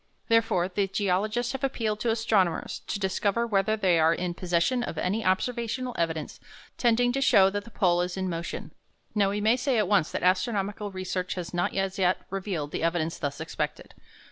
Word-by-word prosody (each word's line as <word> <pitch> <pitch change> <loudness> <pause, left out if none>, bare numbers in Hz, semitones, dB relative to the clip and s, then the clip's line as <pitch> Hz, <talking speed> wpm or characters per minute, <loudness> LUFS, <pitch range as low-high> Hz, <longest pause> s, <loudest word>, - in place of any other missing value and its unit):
Therefore, 225 -6 +3
the 195 +1 -1
geologists 205 +5 0
have 270 0 -5
appealed 225 -6 -1
to 230 - 0
astronomers 220 -6 +1
to - - -2
discover 200 +3 0
whether 215 -1 +1
they 185 -5 +3
are 160 +1 +4
in 180 -1 -2
possession 180 +8 +1
of 165 - -4
any 200 +7 -1
observational 235 +6 -1
evidence 160 -2 -2 0.4
tending 245 0 +3
to 275 +2 -1
show 195 -7 +5
that 205 0 -3
the - - -11
pole 180 -5 +2
is 180 +1 -3
in 190 0 -1
motion. 170 -1 -5 0.4
Now 200 -2 +3
we 205 +1 -2
may 220 +3 +4
say 260 -1 0
at 210 -3 +2
once 195 -5 +2
that - - -3
astronomical 200 +2 0
research 185 -1 -3
has 180 -1 -5
not 175 0 -1
as 195 +1 -1
yet 185 -1 +3
revealed 185 -7 -3
the - - -3
evidence 165 0 -1
thus 140 -2 -3
expected. - - -4
195 Hz, 190 wpm, -27 LUFS, 180-225 Hz, 0.4 s, show